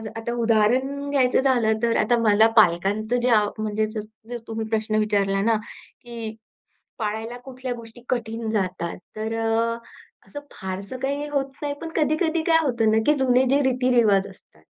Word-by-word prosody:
आता 225 +1 -4
उदाहरण 240 +5 +1
घ्यायचं 260 -3 +3
झालं 245 -5 +2
तर 230 -1 +2
आता 235 +3 +2
मला 215 +2 +6
पालकांचं 205 +4 +3
जे 250 - +1
अ, 215 -3 +4
म्हणजे 215 0 -1
जर 220 +2 -7
तुम्ही 225 -1 -4
प्रश्न 220 -1 -1
विचारला 200 -2 +1
ना 225 +2 +3
की 230 0 -10 0.6
पाळायला 220 +2 -3
कुठल्या 255 -1 -5
गोष्टी 230 0 -12
कठीण 225 -2 -2
जातात. 185 -5 -2 0.2
तर 220 +1 -3
अ, 225 +1 0 0.5
असं 290 - -7
फारसं 190 +5 -6
काही 280 +2 -2
होत 275 -2 -1
नाही, 290 -1 -2
पण 330 - -5
कधी-कधी 315 +1 +1
काय 325 -1 +5
होतं 235 -6 +1
ना 220 - +3
की 300 - +5
जुने 255 -1 +4
जे 280 +2 +3
रीतीरिवाज 245 -6 +3
असतात, 195 - -19
225 Hz, 160 wpm, -23 LUFS, 215-255 Hz, 0.6 s, मला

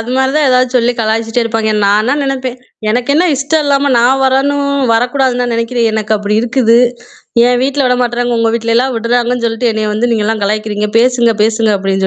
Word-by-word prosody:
அது 225 +2 -6
மாரி 265 0 +1
தான் 305 -1 +2
ஏதாவது 255 0 +2
சொல்லி 240 0 +1
கலாய்ச்சுட்டே 225 +1 -1
இருப்பாங்க. 225 -1 -1
நானா 215 +7 +2
நெனைப்பேன். 260 -2 -3 0.3
எனக்கு 245 +4 0
என்ன 350 +4 +3
இஷ்டம் 295 +3 0
இல்லாம 280 0 +1
நான் 260 +3 +2
வரணும் 280 +2 0 0.2
வரக்கூடாதுன்னா 245 +1 0
நெனைக்கிறேன். 230 0 -1
எனக்கு 215 0 -1
அப்படி 210 +1 -2
இருக்குது 235 -1 +2 0.7
என் 245 0 +1
வீட்ல 275 0 0
விடமாட்றாங்க. 245 -1 0
உங்க 230 0 +1
வீட்லல்லாம் 235 +3 0
விட்றாங்கன்னு 240 +1 -1
சொல்லிட்டு 230 +1 -1
என்னைய 215 -1 -2
வந்து 240 +3 0
நீங்கலாம் 215 -1 -1
கலாய்க்கிறீங்க. 210 0 -2
பேசுங்க, 240 -2 +2
பேசுங்க 220 0 +1
அப்டின்னு 195 0 -1
240 Hz, 170 wpm, -12 LUFS, 225-260 Hz, 0.7 s, என்ன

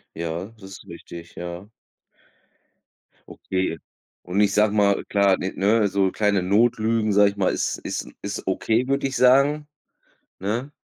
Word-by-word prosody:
Ja, 85 +2 -4
das - - -17
ist 95 - -11
richtig, 85 0 -11
ja. 90 +3 -7 1.6
Okay. 95 -3 -3 0.5
Und 90 +3 -2
ich 100 -1 +3
sage 105 0 +3
mal, 100 -1 +2
Klar, 100 -2 +3
n 95 - -3
ne, 105 +4 +3
also 100 -2 +1
kleine 105 -2 +1
Notlügen, 110 +2 +2
sage 100 0 +5
ich - - -15
mal, 95 - +2
„ist - - -2
ist - - -4
ist - - -5
okay”, 115 +3 0
würde 140 0 0
ich 135 - -4
sagen, 140 +4 +4 0.7
ne? 115 +9 -3
100 Hz, 150 wpm, -23 LUFS, 95-115 Hz, 1.6 s, sage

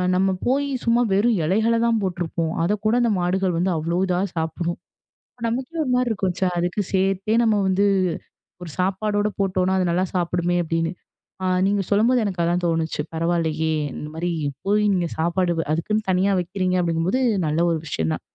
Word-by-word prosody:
நம்ம 190 +1 +2 0.2
போயி 280 +3 +1 0.2
சும்மா 235 +1 +3
வெறும் 215 +3 +3
இலைகளைத் 225 +6 +2
தான் 230 -1 +2
போட்டுருப்போம். 170 -3 -2
அதைக் 205 +4 0
கூட 215 +2 +3
அந்த 235 -2 +2
மாடுகள் 180 0 0
வந்து 180 +2 +1
அவ்ளோ 165 +3 -1
இதா 180 -1 +1 0.2
சாப்பிடணும். 170 +2 -2 0.7
நமக்கு 255 +7 -3
ஒரு 270 - -3
மாரி 250 -1 +1
இருக்கும். 195 -4 -1 0.3
"அதுக்கு 175 +4 -1
சேர்த்தே 195 +2 +1
நம்ம 220 -2 +3
வந்து 190 +1 +2 0.8
ஒரு 175 - -7
சாப்பாடோட 205 +3 0
போட்டோனா, 185 -1 +1
அது 180 -1 +1
நல்லா 180 +2 +1
சாப்பிடுமே!" 175 0 0
அப்பிடின்னு 165 +1 -1 0.7
நீங்கச் 195 -1 0
சொல்லும்போது 230 +5 +3
எனக்கு 190 -4 -2
அதான் 175 +1 +1
தோணுச்சு. 165 -2 0
பரவால்லையே! 160 -1 0 0.2
இந்த 150 - -6
மாரி 170 +2 -2 0.4
போயி 210 +2 +2
நீங்கச் 175 -3 -1
சாப்பாடு 175 +2 +1 0.2
அதுக்குனு 190 +7 0
தனியா 185 +2 +2
வைக்கிறீங்க, 185 +1 -1
அப்பிடீங்கும்போது 170 +6 0 0.3
நல்ல 155 +1 0
ஒரு 165 - +1
விஷயம் 80 - -2
தான். - - -4
185 Hz, 160 wpm, -22 LUFS, 170-205 Hz, 0.8 s, சும்மா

